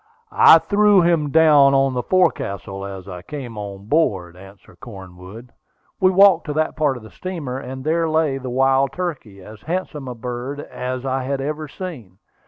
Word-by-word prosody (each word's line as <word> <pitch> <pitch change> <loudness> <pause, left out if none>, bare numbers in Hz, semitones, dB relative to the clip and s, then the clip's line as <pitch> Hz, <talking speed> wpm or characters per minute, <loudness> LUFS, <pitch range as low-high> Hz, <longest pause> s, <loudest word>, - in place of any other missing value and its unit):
"I - - +7
threw 205 -2 +3
him 165 -4 +1
down 145 -2 +5
on 135 -1 +2
the 125 - -1
forecastle 100 - -1
as 95 -1 -9
I 90 -2 -8
came 125 +2 -8
on 100 -1 -8
board," 100 - 0
answered 95 +2 -16
Cornwood. 95 +2 -12 0.5
We 185 - +4
walked 190 -2 +5
to 150 - -2
that 155 +1 -1
part 145 -4 0
of 120 - -13
the 110 - -13
steamer, 155 -9 -6
and 130 0 -8
there 165 +2 0
lay 155 -4 0
the 130 -1 -6
wild 135 +2 +2
turkey, 135 - -6
as 105 +1 -13
handsome 160 -4 -4
a 125 - -6
bird 125 +4 -6
as 130 -2 -6
I 135 0 -1
had 135 +1 -3
ever 150 +3 -4
seen. 135 - -9
135 Hz, 180 wpm, -20 LUFS, 110-155 Hz, 0.5 s, I